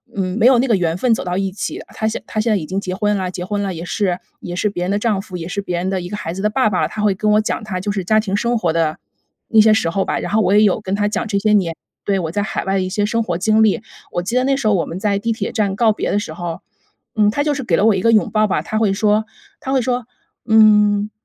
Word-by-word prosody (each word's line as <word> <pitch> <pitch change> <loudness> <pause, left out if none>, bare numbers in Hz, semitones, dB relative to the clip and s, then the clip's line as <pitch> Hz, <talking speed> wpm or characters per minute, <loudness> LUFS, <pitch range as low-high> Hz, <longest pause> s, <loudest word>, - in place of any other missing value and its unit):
嗯， 190 +1 -2
没 230 - +2
有 255 -1 +6
那 260 - +1
个 230 - +3
缘 170 -3 0
分 240 +7 0
走 - - -5
到 180 -1 -3
一 195 -1 -1
起。 195 - -5
他 220 - -3
现 220 - -3
他 215 - -3
现 225 +1 +1
在 210 - +3
已 155 -5 -5
经 190 +4 -2
结 185 -2 -4
婚 210 +1 0
了 185 -1 -3
结 180 - -5
婚 205 +2 -2
了， 195 -2 -2
也 165 0 -6
是 180 -1 -1 0.2
也 175 - -6
是 210 +4 0
别 180 -3 -4
人 180 - -1
的 205 - +1
丈 215 -3 0
夫， 185 - -10
也 165 - -6
是 190 +3 -4
别 180 -3 -3
人 180 +2 -2
的 190 -1 -1
一 175 - -6
个 205 - -5
孩 185 -5 -5
子 190 +3 -5
的 210 - +3
爸 255 -2 +2
爸， 185 - 0
他 215 - -6
会 205 -2 +2
跟 210 +2 0
我 210 +1 +4
讲 215 - -3
他 190 -4 -4
就 205 +3 -2
是 195 -2 -2
家 215 +4 +3
庭 205 -2 -1
生 235 +1 0
活 175 -5 +1
的 160 -1 0 0.5
那 225 - +4
些 215 0 +6
时 190 -6 +1
候 195 +3 -1
吧， - - -1
然 - - -5
后 215 - +3
我 190 -1 +2
也 210 - +6
有 205 -2 +3
跟 195 -3 -4
他 205 +1 +1
讲 215 +2 -2
这 200 -2 0
些 215 +1 +1
年 180 -5 +2 0.3
对， 195 -1 +1
我 165 -3 -3
在 205 +3 -1
海 205 - -3
外 195 0 0
的 195 - +1
一 185 - -2
些 205 +2 -1
生 230 +1 0
活 175 -5 -2
经 215 +3 +3
历。 210 -2 +2 0.3
我 175 - -1
记 195 +7 -3
得 255 - +3
那 275 +1 +2
时 270 -5 -1
候 210 - +4
我 175 - 0
们 175 - -6
在 205 -1 0
地 230 +3 -1
铁 225 - -3
站 205 -4 0
告 225 +1 +3
别 210 - -2
的 - - +1
时 155 - -6
候， 170 0 -5 0.5
嗯， 210 -1 +4
他 285 +6 0
就 295 0 +1
是 275 -1 -4
给 180 -8 +1
了 200 - +2
我 220 - +5
一 190 - -1
个 230 - +3
拥抱 215 -1 +3
吧， 195 - 0
他 215 - -3
会 215 -3 +2
说 210 +2 +2 0.3
他 265 - -5
会 265 - +3
说： 245 0 -1 0.4
“嗯， 210 -1 +5
205 Hz, 345 characters per minute, -19 LUFS, 185-220 Hz, 0.5 s, 有